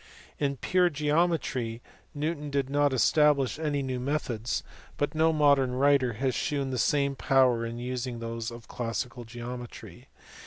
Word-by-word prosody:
In 140 -1 0
pure 180 +6 +2
geometry, 150 -6 0 0.4
Newton 150 0 -2
did 140 -1 -1
not 145 0 +3
establish 140 +2 +3
any 145 -3 -1
new 130 -1 -3
methods, 125 -4 -2 0.3
but 145 - -1
no 160 +1 +3
modern 140 -4 +3
writer 135 -2 +3
has 130 +4 -1
shewn 140 -5 -1
the 130 - -2
same 140 -1 +2
power 125 -3 +3
in 115 +1 -6
using 125 0 -4
those 115 0 -4
of 115 -1 -11
classical 120 0 -4
geometry. 120 +1 -8
135 Hz, 145 wpm, -28 LUFS, 120-145 Hz, 0.4 s, not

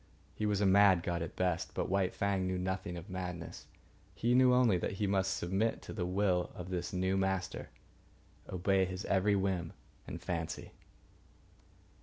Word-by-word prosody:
He 105 - -2
was 105 -1 +1
a - - +3
mad 95 -2 +6
god 85 -1 -1
at 85 - -5
best, 90 -1 -1
but - - -1
White 95 -1 0
Fang 100 -2 0
knew 95 0 -1
nothing 95 -1 -3
of 85 +3 -8
madness; 90 -3 -6 0.5
he 120 +2 +1
knew 130 0 +6
only 125 -5 +5
that - - -2
he 100 +2 -1
must 95 -1 +1
submit 95 +6 0
to - - -7
the 90 -4 -2
will 90 -1 +1
of 90 +1 -7
this 90 0 -2
new 95 0 0
master, 95 -1 -1 0.8
obey 95 +1 +2
his 95 +2 -5
every 100 +1 +2
whim 95 -4 -1 0.3
and 85 - -6
fancy. 85 -2 -4
95 Hz, 170 wpm, -33 LUFS, 90-100 Hz, 0.8 s, mad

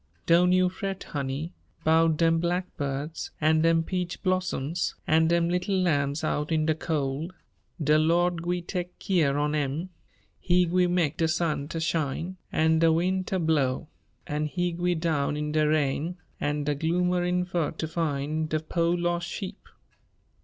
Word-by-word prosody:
"Doan' 175 +2 +5
you 185 0 +4
fret, 190 +1 -4
honey, 140 +4 -4 0.3
'bout 160 0 +4
dem 165 0 +3
blackbirds, 160 -4 -3
an' 155 +1 +3
dem 165 0 +3
peach 180 0 -3
blossoms, 180 -4 -1
an' 160 +1 +4
dem 170 0 +2
little 180 +3 0
lambs 145 -5 +1
out 150 +2 -1
in 155 -1 +2
de 160 - +3
cold. 155 +2 -2 0.4
De 150 0 +3
Lord 170 +2 +2
gwi' 175 +1 -1
teck 180 -1 -4
keer 155 -7 +1
on 150 +1 0
'em. 150 +4 -1 0.5
He 180 0 +3
gwi' 180 +1 +2
meck 170 -4 +1
de 165 - +2
sun 155 -3 0
ter 165 - -4
shine, 165 +2 -2
an' 160 0 +3
de 165 0 +5
win' 185 +3 +1
ter 190 - -2
blow; 155 -4 0 0.4
an' 150 +1 -2
He 175 +3 -1
gwi' 175 +1 0
down 150 -3 0
in 150 0 -2
de 155 0 +2
rain 155 +3 0 0.2
an' 145 0 -1
de 145 0 0
gloomerin' 180 +3 +1
fur 175 -4 -1
ter 160 - -4
fin' 155 -1 -1
de 155 0 0
po' 165 +2 0
los' 175 0 0
sheep. 190 +3 -6
165 Hz, 160 wpm, -27 LUFS, 150-175 Hz, 0.5 s, Doan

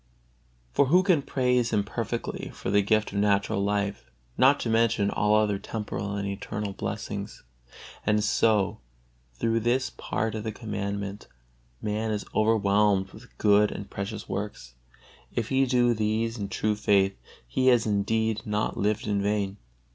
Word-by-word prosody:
For 140 - +4
who 180 +6 +5
can 180 -6 +3
praise 125 -3 +1
Him 105 -2 +2
perfectly 115 +2 -4
for - - -4
the 100 0 +4
gift 110 +2 +1
of 100 - -2
natural 100 -1 +2
life, 100 0 -1 0.3
not 135 +3 +5
to - - -2
mention 115 -2 +2
all 105 0 +2
other 105 -2 +2
temporal 100 -2 -4
and 100 0 -2
eternal 100 +1 -4
blessings? - - -5 0.6
And 105 0 +2
so 105 -3 +2 0.6
through 115 - +1
this 120 +3 +1
one - - -30
part 110 +3 -2
of 110 -1 -4
the 110 - -3
Commandment 100 -2 -4 0.6
man 105 +1 -1
is 105 -1 -2
overwhelmed 105 -3 +2
with - - -15
good 105 0 +4
and 100 - -7
precious 100 +2 -5
works; 95 -11 -5 0.6
if 115 -2 -1
he 135 0 +2
do 120 -1 +3
these 110 +1 0
in 100 -4 -4
true 105 +2 0
faith, 100 -2 +2 0.3
he 130 - 0
has 120 -3 +5
indeed 110 +1 0
not 105 0 -1
lived 105 +1 0
in 105 -1 0
vain. 100 -1 -1
105 Hz, 155 wpm, -27 LUFS, 100-115 Hz, 0.6 s, who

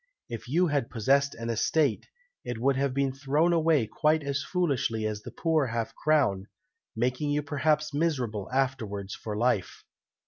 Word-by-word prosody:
If 115 0 -6
you 175 +6 +3
had 145 -7 0
possessed 140 +4 +2
an 115 0 -3
estate, 135 +2 +1 0.4
it 120 - -4
would 135 +4 +2
have 140 0 0
been 135 0 0
thrown 145 +5 +1
away 160 -6 +3
quite 155 +7 +1
as 140 0 -1
foolishly 140 - -1
as 105 -1 -3
the - - -8
poor 160 -4 +1
half 115 -1 -3
crown, 130 -11 +1 0.5
making 130 +5 0
you 145 0 0
perhaps 150 +1 0
miserable 130 - -1
afterwards 115 -7 -1
for 105 -2 -5
life." 115 -5 0
135 Hz, 160 wpm, -28 LUFS, 115-150 Hz, 0.5 s, you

